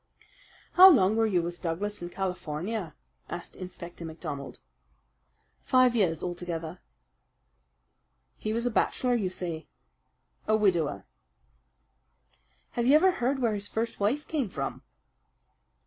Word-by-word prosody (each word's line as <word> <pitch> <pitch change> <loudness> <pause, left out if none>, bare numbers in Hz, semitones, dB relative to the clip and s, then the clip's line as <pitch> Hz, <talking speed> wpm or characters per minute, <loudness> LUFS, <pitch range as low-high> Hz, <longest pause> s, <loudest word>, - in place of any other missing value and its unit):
"How 370 +1 +10
long 210 - +5
were 225 0 +3
you 180 -5 +1
with 175 +1 -6
Douglas 195 +5 -3
in 175 - -5
California?" 180 0 -4 0.3
asked 175 - -7
Inspector 175 -2 -9
MacDonald. 160 -3 -6 1.0
"Five 255 -2 +4
years 175 -8 +1
altogether." 175 -1 -4 1.6
"He 215 - -3
was 230 +2 -1
a 245 - +1
bachelor, 250 +3 +1
you 210 -6 0
say?" 170 -3 -5 0.8
"A 215 - +4
widower." 175 -8 +1 1.7
"Have 240 0 -1
you 280 - +7
ever 370 +5 +6
heard 265 -4 0
where 225 -2 +2
his 205 0 -2
first 230 +1 -3
wife 235 +9 0
came 280 -9 -1
from?" 135 -6 -4
190 Hz, 120 wpm, -28 LUFS, 170-230 Hz, 1.7 s, How